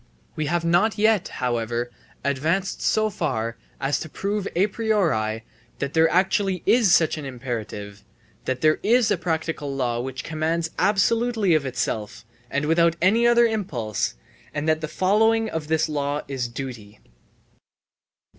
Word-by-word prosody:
We 155 -1 -2
have 170 +1 0
not 175 +7 +3
yet, 215 -2 +3
however, 120 -1 -2 0.3
advanced 160 +8 0
so 215 0 +2
far 115 - -2 0.2
as 135 +1 0
to 160 - -6
prove 200 +4 -2
a 185 +3 +4
priori 170 - 0 0.3
that 140 0 -3
there 160 0 +4
actually 185 +1 +1
is 230 -5 +4
such 160 -2 +3
an 145 - -7
imperative, 110 -6 -6 0.4
that 130 -1 -2
there 155 0 +3
is 240 +1 +3
a - - +2
practical 160 -4 -2
law 120 -3 -1
which 130 0 -5
commands 160 +1 -1
absolutely 220 0 +2
of 150 -3 +2
itself 110 -4 -3 0.2
and 140 +1 -1
without 165 +1 +3
any 220 +7 +4
other 240 0 +5
impulse, 145 - -2 0.4
and 145 +1 -2
that 155 0 +2
the 155 - -2
following 220 +7 +2
of 160 -2 -4
this 160 0 +1
law 145 -1 -2
is 135 -3 -2
duty. 120 -5 -7
160 Hz, 145 wpm, -24 LUFS, 130-195 Hz, 0.4 s, other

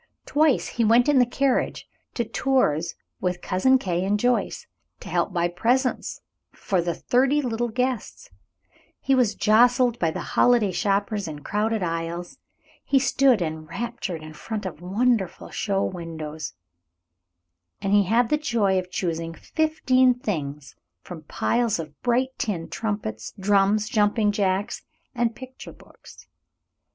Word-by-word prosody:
Twice 300 -2 +2
he 235 - -1
went 230 +4 +4
in 290 -3 +4
the 245 - +4
carriage 265 +2 0 0.3
to 235 - 0
Tours 215 - 0 0.2
with 180 -1 -2
Cousin 230 +8 +3
Kate 180 -7 -2
and 205 +2 +1
Joyce, 245 +2 0 0.3
to - - -10
help - - 0
buy 175 -1 +1
presents 245 +9 0 0.3
for 190 -3 -1
the 170 -1 -2
thirty 270 +4 +2
little 240 -3 -1
guests. 255 - -3 0.7
He 270 - +1
was 245 -6 +3
jostled 240 +2 +4
by 165 - +2
the 160 - -4
holiday 235 -5 +4
shoppers 200 +1 0
in 150 -2 -7
crowded 215 0 -1
aisles. 165 +1 -4 0.4
He 275 - +2
stood 260 -5 +3
enraptured 170 +3 -5
in 155 0 -9
front 210 +6 -5
of 175 -3 -6
wonderful 205 +1 0
show 195 -2 -1
windows, 160 -3 -6 1.3
and 195 - -1
he 205 -1 +5
had 230 +4 +2
the 300 - +2
joy 215 -9 +1
of 180 0 -7
choosing 165 -2 -3
fifteen 260 - +2
things 150 - -4 0.3
from 165 -4 -10
piles 235 +6 0
of 155 -3 -8
bright 250 +2 +1
tin 175 -7 -2
trumpets, 205 - -4
drums, 205 +2 +2
jumping 210 0 +2
jacks, 195 -1 -1 0.3
and 240 -2 0
picture 260 0 -10
books. - - -17
210 Hz, 140 wpm, -24 LUFS, 175-245 Hz, 1.3 s, he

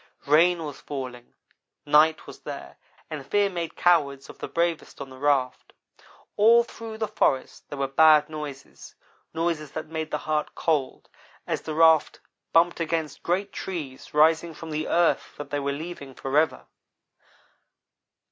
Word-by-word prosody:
Rain 165 +4 +4
was 145 -2 -8
falling 130 -4 -7 0.5
night 150 +2 +4
was - - -11
there, - - -8 0.3
and 150 -3 -5
fear 200 +6 +1
made 170 -2 -4
cowards 140 -6 +2
of - - -21
the - - -5
bravest 170 -1 -2
on 140 -1 -8
the 130 - -12
raft. 135 -3 0 0.6
All 230 +3 +6
through 225 -1 -9
the 220 -1 -2
forest 135 -10 -1
there 145 - -6
were 135 0 0
bad 150 +2 +5
noises 150 -3 -9 0.4
noises 160 -3 -2
that 155 -1 -6
make 160 -1 -4
the - - -1
heart 155 -1 -1
cold 145 -5 -1 0.4
as - - -2
the 155 - -5
raft 160 -1 +4 0.3
bumped 170 +1 +3
against 160 -3 -2
great 195 +4 -1
trees 150 -8 -6
rising 160 +2 +3
from 165 +1 -8
the 155 +1 -2
earth 170 -1 +1
that 145 -1 -8
they 145 - 0
were 140 0 -1
leaving 140 -3 -7
forever. 150 +4 0
155 Hz, 150 wpm, -25 LUFS, 140-170 Hz, 0.6 s, All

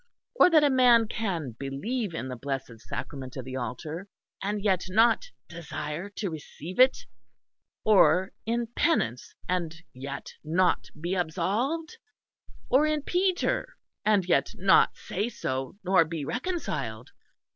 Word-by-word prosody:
Or 485 - +6
that 315 -3 +6
a 290 - +4
man 245 -3 +5
can 180 - -2
believe 175 - -3
in 130 - -4
the 130 - -5
blessed 135 -2 -5
sacrament 130 +2 -6
of 130 - -5
the 130 0 -6
altar 150 - -5 0.3
and 205 +1 -1
yet 190 -4 +2
not 230 - +3 0.2
desire 165 +1 -5
to 195 -4 -3
receive 160 - -8
it; 260 +1 +5 0.8
or 185 -3 +5
in 235 +1 0
penance 125 - 0
and 175 -3 -1 0.2
yet 140 +2 -7
not 175 +4 +2
be 175 +4 -2
absolved; 200 - -1 0.7
or 285 +4 +4
in 305 -2 0
Peter 365 +2 0 0.3
and 210 -4 +3
yet 175 - +1
not 190 +1 +4
say 205 +5 -3
so, 130 - -4
nor 185 -2 +5
be 160 -3 -5
reconciled. 335 - -3
185 Hz, 135 wpm, -28 LUFS, 150-235 Hz, 0.8 s, Or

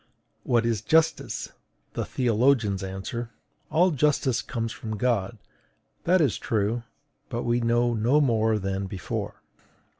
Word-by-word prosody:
What 120 -2 +1
is 115 -3 0
justice? 160 +5 +1 0.4
The - - -2
theologians 115 -4 +2
answer: 95 +5 -5 0.4
"All 180 +3 +4
justice 140 -4 +1
comes 115 -3 -3
from 110 -1 -5
God." 115 -2 0 0.7
That 180 +1 +4
is 140 -8 +1
true; 110 +2 0 0.5
but 120 -2 -3
we 120 0 +1
know 120 0 +2
no 120 +6 +3
more 110 -5 +2
than 95 -1 -2
before. 95 -1 -5
115 Hz, 125 wpm, -26 LUFS, 110-130 Hz, 0.7 s, All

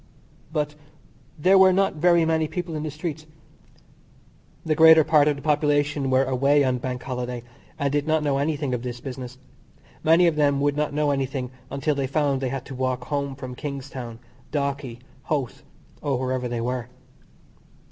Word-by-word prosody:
But 150 -2 -1 0.6
there 185 +5 +5
were 190 0 +7
not 195 +1 +2
very 170 +1 +3
many 160 -1 +1
people 175 0 -4
in 155 - -3
the 155 - -3
streets. 155 0 -6 1.4
The 160 - +2
greater 160 0 +8
part 150 -1 +4
of 150 - +2
the 140 - -10
population 145 -2 +1
were 130 +1 +4
away 140 +2 +3
on 130 -2 +1
Bank 125 0 -4
Holiday, 125 -2 -4 0.3
and 140 -1 0
did 145 +1 0
not 155 -1 +2
know 140 -2 +1
anything 145 -2 -1
of 125 - -2
this 120 -1 -5
business. 130 -1 -7 0.7
Many 165 +3 +5
of 165 -3 +2
them 140 -2 +3
would 145 0 +1
not 150 0 -1
know 150 0 +1
anything 135 -2 -2 0.2
until 140 +3 -1
they 140 -2 -1
found 140 -1 0
they 130 - -1
had 135 0 -4
to - - -8
walk 130 -1 -2
home 140 -1 -3
from 130 -2 -7
Kingstown, 130 -4 -6 0.3
Dalkey, 140 -4 -3 0.2
Howth, 140 -6 -2 0.4
or 140 -3 0
wherever 130 0 -2
they 120 -1 -3
were. 125 0 -2
140 Hz, 175 wpm, -24 LUFS, 130-150 Hz, 1.4 s, greater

